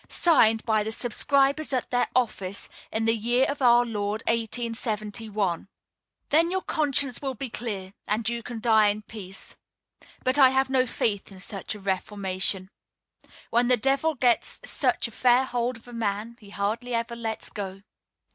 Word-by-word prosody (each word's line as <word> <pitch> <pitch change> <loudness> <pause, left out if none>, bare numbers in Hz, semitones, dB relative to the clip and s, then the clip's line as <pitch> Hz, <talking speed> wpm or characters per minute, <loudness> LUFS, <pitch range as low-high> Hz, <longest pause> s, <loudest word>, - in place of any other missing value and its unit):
Signed 225 -10 +3
by 220 -2 +2
the 215 +1 -3
subscribers 275 +6 +2
at 255 - -1
their 245 0 +2
office, 200 -6 -1 0.2
in 225 0 -1
the 225 0 +3
year 240 +4 +2
of 285 0 -4
our 240 -1 +5
Lord_ 210 -1 -3
1871." 220 -4 -2 0.6
Then 325 +3 +4
your 375 +1 -1
conscience 285 -5 +2
will 270 -2 -3
be 255 0 -5
clear, 200 -6 -5
and 215 +1 -1
you 235 0 -1
can 235 -1 -7
die 220 -2 +4
in 210 +1 -1
peace. 195 -3 -10 0.7
But 260 +3 +2
I 265 -2 +8
have 265 0 +1
no 260 -1 +3
faith 205 -3 -2
in 190 - -12
such 195 +2 -5
a - - -9
reformation. 190 -1 -1 0.8
When 240 +1 +3
the 250 0 +4
devil 275 +6 +1
gets 245 -2 +1
such - - +1
a - - -12
fair 250 +3 +3
hold 245 -1 -2
of 230 - -19
a 245 - -11
man 220 0 -3
he 205 - -15
hardly 220 +5 -2
ever 230 +1 -2
lets 225 -2 -4
go. 195 -2 -5
230 Hz, 165 wpm, -26 LUFS, 210-255 Hz, 0.8 s, I